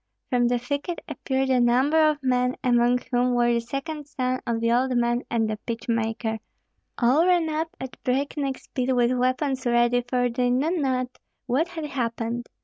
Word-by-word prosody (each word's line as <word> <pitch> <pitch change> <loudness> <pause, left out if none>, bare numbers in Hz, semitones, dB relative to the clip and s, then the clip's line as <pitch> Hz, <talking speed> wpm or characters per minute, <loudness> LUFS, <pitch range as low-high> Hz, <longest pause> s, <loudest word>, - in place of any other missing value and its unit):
From 245 -1 +3
the 245 0 +2
thicket 285 +7 -3
appeared 265 0 -1
a 255 - +4
number 270 +6 +4
of 295 -2 -3
men, 250 -1 +1
among 245 0 +3
whom 245 0 +2
were 240 0 +3
the 235 - +1
second 285 +5 -5
son 255 -2 -2
of 230 -1 0
the 230 0 +1
old 250 +1 +2
man 240 0 +1
and 225 -2 +1
the 215 0 -3
pitch 230 +2 -6
maker; 225 -1 -1 0.6
all 260 +7 +4
ran 350 -3 +3
up 320 +1 -1
at 260 -2 -8
breakneck 275 +1 -1
speed 255 0 -3
with 245 -1 +3
weapons 255 +2 0
ready, 240 0 +3
for 245 -1 +2
they 245 +1 0
knew 285 +8 +1
not 255 -4 -1 0.3
what 280 +8 +1
had 330 -3 -6
happened. 235 -3 -3
250 Hz, 180 wpm, -25 LUFS, 240-275 Hz, 0.6 s, a